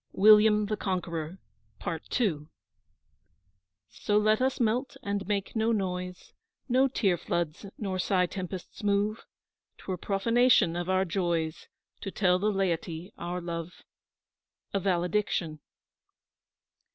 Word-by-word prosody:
WILLIAM 210 +1 +6
THE 215 +1 -2
CONQUEROR 175 -3 -3 0.4
PART 165 - -4
II 160 -11 0 1.4
So 205 - 0
let 215 +2 +3
us 260 0 +1
melt 245 +3 0
and 200 -2 -2
make 200 0 -2
no 220 +1 +2
noise, 180 -3 -3 0.3
No 260 +1 +4
tear 200 -8 +1
floods 170 +3 -2
nor 190 -3 -3
sigh 180 0 +2
tempests 185 0 -6
move; 205 +1 0 0.5
'Twere 185 -2 -5
profanation 210 -1 +3
of 175 +1 -3
our 190 0 +2
joys 170 -3 -1 0.3
To 195 - -5
tell 185 -2 +2
the 210 +3 +1
laity 175 -2 -2
our 175 +1 -3
love. 170 0 -6 0.9
A 200 - +2
VALEDICTION. 180 -3 0
190 Hz, 115 wpm, -29 LUFS, 175-210 Hz, 1.4 s, WILLIAM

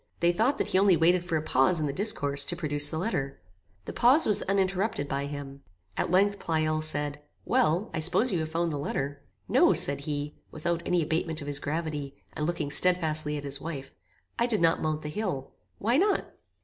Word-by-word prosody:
They 170 0 +3
thought 225 +10 +1
that - - -1
he 185 - +2
only 195 -3 +5
waited 175 +2 +3
for 170 -2 -1
a 155 - -3
pause 155 +4 +2
in 155 - -1
the 140 - -2
discourse, 145 -8 0
to 175 - -1
produce 145 -3 +1
the 160 - -4
letter. 140 - -3 0.5
The - - -6
pause 265 +7 +5
was 210 - +6
uninterrupted 195 -4 0
by 140 0 -2
him. 140 -1 -8 0.3
At - - -1
length 200 +3 +2
Pleyel 155 -1 0
said, 145 -1 -1 0.2
"Well, 170 +8 +1
I - - -2
suppose 180 +10 +1
you 180 - 0
have 160 0 -3
found 165 +1 -1
the 145 - -3
letter." 140 0 -3 0.3
"No," - - +4
said 140 0 +5
he, 145 0 -4 0.2
without 170 +2 -2
any 175 -2 +2
abatement 160 +1 -1
of 145 - -7
his 145 -1 -3
gravity, 150 -3 -4 0.2
and 150 - -2
looking 165 -4 -2
stedfastly 155 -4 +1
at 145 - -6
his 140 0 -4
wife, 140 -5 -6 0.5
"I 235 - +2
did 220 -4 0
not 165 -1 +2
mount 155 0 -2
the 150 - -4
hill." 150 -7 -4 0.3
"Why 235 +5 +1
not?" 395 +4 +1
160 Hz, 205 wpm, -28 LUFS, 145-180 Hz, 0.5 s, was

